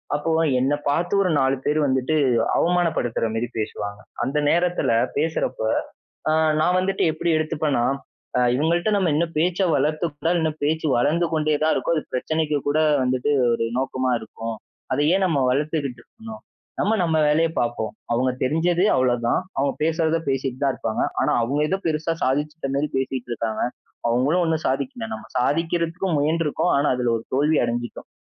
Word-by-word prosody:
அப்போ 155 +2 -1 0.3
என்னை 135 +3 +2
பார்த்து 170 +6 0
ஒரு 185 - +1
4 135 0 +2
பேர் 150 +1 +1
வந்துட்டு 130 +3 +1 0.4
அவமானப்படுத்துற 165 -10 +1
மேரி 115 +2 -1
பேசுவாங்க. 105 -1 -4 0.2
அந்த 140 +3 -1
நேரத்துல 175 -5 +1 0.3
பேசுறப்போ, 155 -7 -1 0.9
நான் 180 +3 +3
வந்துட்டு 195 +1 0
எப்பிடி 165 +2 -1
எடுத்துப்பேனா, 150 -5 0 0.5
"அ - - +3 0.2
இவங்கள்ட்ட 170 +8 +1
நம்ம 180 -5 +1
இன்னும் 165 +1 0
பேச்ச 175 +3 +1 0.2
வளர்த்து 155 +4 0
கொண்டால், 165 +4 0
இன்னும் 155 -1 -1
பேச்சு 160 +1 0
வளர்ந்து 165 +7 +2
கொண்டே 155 -1 +1
தான் 160 - +3
இருக்கும். 170 - 0
அது - - -2
பிரச்சனைக்கு 155 +2 0
கூட 155 +2 +2 0.2
வந்துட்டு, 130 +3 0 0.2
ஒரு 115 - 0
நோக்கமா 130 -1 -1
இருக்கும். 115 +1 -6 0.4
அது 145 +3 +1
ஏன் 195 - +1
நம்ம 150 -5 +1
வளர்த்துக்கிட்டு 140 -3 -2
இருக்கணும். 225 -1 -11 0.4
நம்ம 215 +3 +2
நம்ம 160 -2 +1
வேலைய 160 +2 +3
பாப்போம். 120 -2 -2 0.2
அவங்க 130 +2 +1
தெரிஞ்சது 170 +6 +1
அவ்வளோதான். 120 +2 +1 0.2
அவங்க 140 0 +1
பேசுறத 160 0 +1
பேசிட்டு 135 -1 -2
தான் 135 -2 +2
இருப்பாங்க. 110 -1 -2 0.2
ஆனா, - - +2
அவங்க 140 +5 -1
ஏதோ 190 - +1
பெருசா 155 +1 0
சாதிச்சிட்ட 145 +2 -1
மாரி 145 +2 0
பேசிட்டு 130 -2 -3
இருக்காங்க. 110 -1 -2 0.5
அவங்களும் 140 +9 +2
ஒண்ணும் 160 -1 -1
சாதிக்கல. 130 -4 -2
நம்ம 110 0 -11
சாதிக்கிறதுக்கு 165 +6 0
முயன்றுருக்கோம். 160 +3 +1
ஆனா, 145 - +2
அதுல 120 -2 +1
ஒரு 115 - -10
தோல்வி 150 +3 +3
அடைஞ்சுட்டோம். 120 0 -5
150 Hz, 155 wpm, -23 LUFS, 130-165 Hz, 0.9 s, நான்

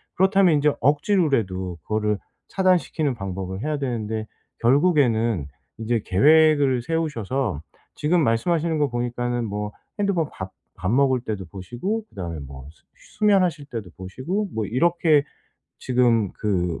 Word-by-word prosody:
그렇다면 190 -2 +4
인제 150 0 +2
억지로라도 135 - +1
그거를 105 -1 -1 0.3
차단시키는 175 -7 +1
방법을 95 0 -5
해야 150 0 -1
되는데 110 -5 -3 0.3
결국에는 120 - +2 0.3
이제 115 0 0
계획을 145 +3 +4
세우셔서 130 - -2 0.3
지금 160 +2 +2
말씀하시는 160 +7 +1
거 145 -2 +2
보니까는 120 0 -2
뭐 105 0 -4 0.3
핸드폰 190 -6 +1
밥 95 0 -7 0.2
밥 95 +2 -2
먹을 130 0 +3
때도 105 -6 -4
보시고 120 - -4
그다음에 85 -4 -6
뭐 65 -1 -10
수 80 - -29 0.4
수면하실 185 -8 +3
때도 115 -9 -6
보시고 140 - -3
뭐 110 -1 -1
이렇게 155 - +3 0.6
지금 120 -5 +2
그 90 -5 -1
125 Hz, 310 characters per minute, -23 LUFS, 105-155 Hz, 0.6 s, 그렇다면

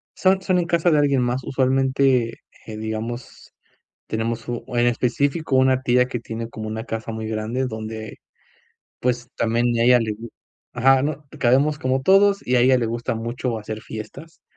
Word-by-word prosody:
Son 190 0 +2
son 185 -1 +1
en 175 - +1
casa 170 0 +2
de 155 - +4
alguien 140 -3 +3
más. 125 +1 -1
Usualmente, 130 -2 +1 0.3
eh, 110 -1 -7
digamos 110 +3 -6 0.5
tenemos, 115 +1 -3
u 120 -1 -4
en 120 0 +3
específico 140 +4 0
una 130 0 +3
tía 125 0 +3
que 120 - -3
tiene 115 0 -6
como 110 -1 -7
una 110 +1 -4
casa 115 0 -5
muy 110 0 -5
grande, 110 +4 -2
donde 110 -1 -6 0.8
pues, 125 0 -1
también 115 +1 +1
y 120 -1 0
a - - +3
ella 125 0 +6
le 110 -2 -2
gu 115 +2 -10 0.4
ajá 130 +2 +4
no 150 -1 -3
cabemos 135 +5 +3
como 130 -1 0
todos, 200 +4 +4
y 125 - +1
a - - +5
ella 130 +1 +5
le 115 - 0
gusta 115 +1 -2
mucho 115 +1 -3
hacer 110 +1 -6
fiestas. 135 +10 -9
125 Hz, 180 wpm, -22 LUFS, 115-135 Hz, 0.8 s, ella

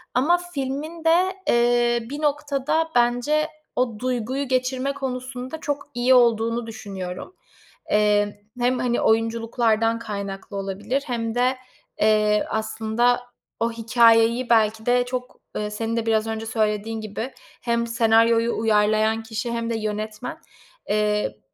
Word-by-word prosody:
ama 315 +8 +4 0.2
filmin 290 +5 -4
de, 365 +3 +3
eee, 240 -1 +2
bir 290 +2 -5
noktada, 295 +2 0
bence, 245 +6 +2 0.3
o 235 -4 -1
duyguyu 255 +2 -2
geçirme 255 +2 0
konusunda 255 +1 -5
çok 290 -2 -3
iyi 245 +2 +3
olduğunu 230 -1 +3
düşünüyorum. 195 - -7 0.5
Emm, 210 -1 +2 0.3
hem, 250 +1 +1
hani, 245 -1 0
oyunculuklardan 225 0 +1
kaynaklı 200 -3 -6
olabilir 200 +8 -2
hem 230 -2 -2
de, 250 +1 +2 0.4
eee, 210 -1 +3
aslında 220 +3 0 0.4
o 230 0 +1
hikâyeyi, 230 +1 +3
belki 220 -1 +3
de, 245 0 +3
çok, 250 0 -5 0.2
ııı, 210 0 -3
senin 225 +2 -3
de 230 - -1
biraz 220 0 +1
önce 220 0 -3
söylediğin 220 0 -1
gibi 220 +4 -5 0.3
hem 235 -1 0
senaryoyu 230 0 +3
uyarlayan 215 0 +2
kişi 225 +1 -4
hem 230 0 -2
de 230 - -1
yönetmen, 215 0 -4 0.5
eee, 210 - 0
230 Hz, 125 wpm, -23 LUFS, 220-255 Hz, 0.5 s, ama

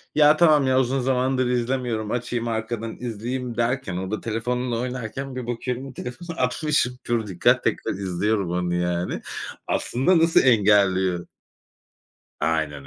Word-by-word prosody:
ya 150 0 +6
tamam 155 -5 +5
ya, 130 0 +4
uzun 130 +1 +1
zamandır 130 0 +1
izlemiyorum, 120 -3 -1
açayım, 120 -1 -2
arkadan 115 0 -3
izleyeyim 120 +1 -4
derken 120 -5 -1
orada 95 +3 -3
telefonla 120 +1 -2
oynarken 130 +2 -4
bir 125 -2 -5
bakıyorum 125 +2 -3
o 135 - -10
telefonu 125 +8 -7
atmışım. 125 -1 +1
Pür 115 -2 -1
dikkat 90 -3 +2
tekrar - - -1
izliyorum 100 +1 -1
onu, 90 0 -1
yani. 90 0 -1 0.5
Aslında 150 +9 +2
nasıl 165 0 +5
engelliyor? 100 -6 +3 1.1
Aynen 75 -3 -1
120 Hz, 130 wpm, -24 LUFS, 100-130 Hz, 1.1 s, ya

